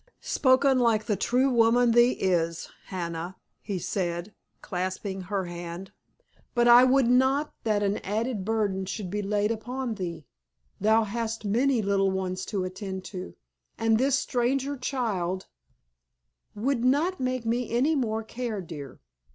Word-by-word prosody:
"Spoken 265 0 +3
like 230 -3 +3
the 210 - +1
true 255 +7 +2
woman 235 0 +4
thee 240 +2 +5
is, 170 -3 -1 0.2
Hannah," 170 0 -5 0.3
he 200 -3 -3
said, 175 +1 -3 0.3
clasping 185 +1 -4
her 190 0 -2
hand. 175 +2 -7 0.6
"But 240 0 +4
I 240 +1 +9
would 260 -1 +4
not 265 +4 +2
that 210 -2 +1
an 200 +1 0
added 215 +1 -2
burden 200 -3 -1
should 195 -2 -5
be 210 +1 -1
laid 205 +1 0
upon 245 +2 -3
thee. 170 -6 -5 0.5
Thou 220 +3 +4
hast 225 +1 -3
many 240 +3 +2
little 195 -1 +2
ones 190 -1 -2
to 195 -3 -2
attend 190 0 -5
to, 185 0 -7 0.4
and 225 -1 +2
this 270 +1 +3
stranger 265 +2 0
child——" 210 -9 -2 1.1
"—Would 235 +3 0
not 305 +9 +2
make 255 -2 -2
me 235 +1 -1
any 255 +7 +2
more 225 -6 -1
care, 230 -1 -4
dear. 155 -7 -9
220 Hz, 145 wpm, -27 LUFS, 190-245 Hz, 1.1 s, I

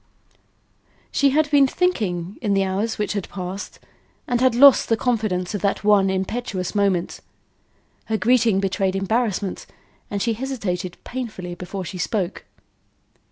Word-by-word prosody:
She 280 - +3
had 295 +1 +1
been 280 -2 +6
thinking 205 - -1
in 205 -4 +1
the 195 - +3
hours 200 +4 -1
which 210 - -1
had 200 -3 -4
passed, 185 +1 -6 0.5
and 245 -1 0
had 255 -2 +3
lost 275 +1 +7
the 225 - +3
confidence 215 -7 -1
of 205 - -3
that 200 - 0
one 205 -2 +4
impetuous 190 0 -3
moment. 195 -4 0 0.9
Her 220 - -1
greeting 230 -3 +3
betrayed 195 0 0
embarrassment 200 -1 -1 0.4
and 200 - -2
she 230 +3 0
hesitated 210 -8 -4
painfully 215 -8 -5
before 180 +2 -6
she 185 +1 -7
spoke. 190 0 -2
205 Hz, 140 wpm, -22 LUFS, 190-240 Hz, 0.9 s, lost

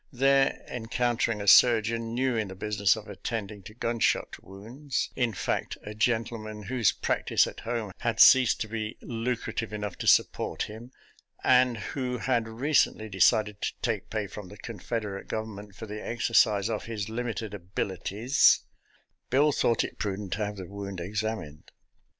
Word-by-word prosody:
There 135 +1 +2
encountering 120 -2 -1
a 100 - -5
surgeon 115 0 +5
new 130 0 +1
in 110 -2 -1
the 95 - -8
business 100 0 +2
of 110 -1 -9
attending 105 0 -5
to 105 +3 -12
gunshot 115 -1 0
wounds 120 +9 -5
— - - -34
^in 120 -5 0
fact, - - -2
a 105 - -7
gentleman 110 -1 -1
whose 120 0 +2
practice - - +1
at - - -8
home 115 -3 -3
had 115 -1 -1
ceased 130 -3 +7
to 110 - -1
be 110 +1 -4
lucrative 115 -1 -3
enough 105 -3 -5
to - - -4
support - - +3
him, 115 +4 -9 0.5
and 125 -2 +4 0.2
who 125 -2 -2
had 115 +1 0
recently 115 -2 +1
decided 105 +2 +2
to - - -1
take 110 -5 -2
pay 110 -2 -2
from 100 0 -9
the 105 - -12
Confederate 105 -2 -5
Gov 110 0 -2
ernment 105 -2 -10
for 110 - -8
the 105 0 -7
exercise 110 -3 +2
of 110 -2 -3
his 110 -3 -4
limited 115 -2 -4
abilities 100 +6 +2 0.3
— - - -40
Bill 145 +4 +4
thought 115 -4 +2
it - - -7
prudent 100 -3 -3
to 105 +1 -1
have 105 0 -7
the 95 - -6
wound 100 0 -7
ex 100 +5 -2
amined. 95 -10 -5
110 Hz, 170 wpm, -28 LUFS, 105-120 Hz, 0.5 s, ceased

